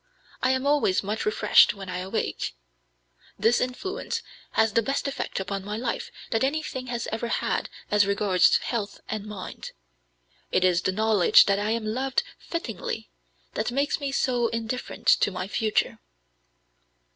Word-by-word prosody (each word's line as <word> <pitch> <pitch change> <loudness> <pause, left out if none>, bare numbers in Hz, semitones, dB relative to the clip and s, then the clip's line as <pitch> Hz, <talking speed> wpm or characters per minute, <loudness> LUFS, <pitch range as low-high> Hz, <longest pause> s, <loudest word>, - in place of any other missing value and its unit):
I 255 - +2
am 260 +1 +1
always 285 -11 +3
much 210 - -2
refreshed 425 - +5
when 195 -1 -8
I 180 0 -3
awake. 185 - -3 0.8
This 225 +4 +3
influence 255 +10 -3 0.3
has 220 -1 +3
the 230 - +4
best 275 +5 -1
effect 275 - -3
upon 195 0 -3
my 210 +2 -4
life 235 +1 -3 0.2
that 225 +2 +1
anything 270 -2 -2
has 240 -1 -3
ever 225 +2 -2
had - - -1 0.2
as 205 -1 +4
regards 200 -2 +4
health 215 -4 -3
and 215 -1 -4
mind. 205 -3 -7 0.8
It - - +2
is 180 -1 +3
the 190 - +1
knowledge 215 -1 +5
that 200 0 +2
I 205 +1 -1
am 225 0 -1
loved 260 +5 0 0.2
fittingly 225 - -5 0.4
that - - -1
makes 280 +3 0
me 280 -2 -2
so 245 -3 +1
indifferent 230 +2 -4
to - - +5
my 185 -1 -4
future. 215 +1 0
220 Hz, 155 wpm, -26 LUFS, 200-255 Hz, 0.8 s, refreshed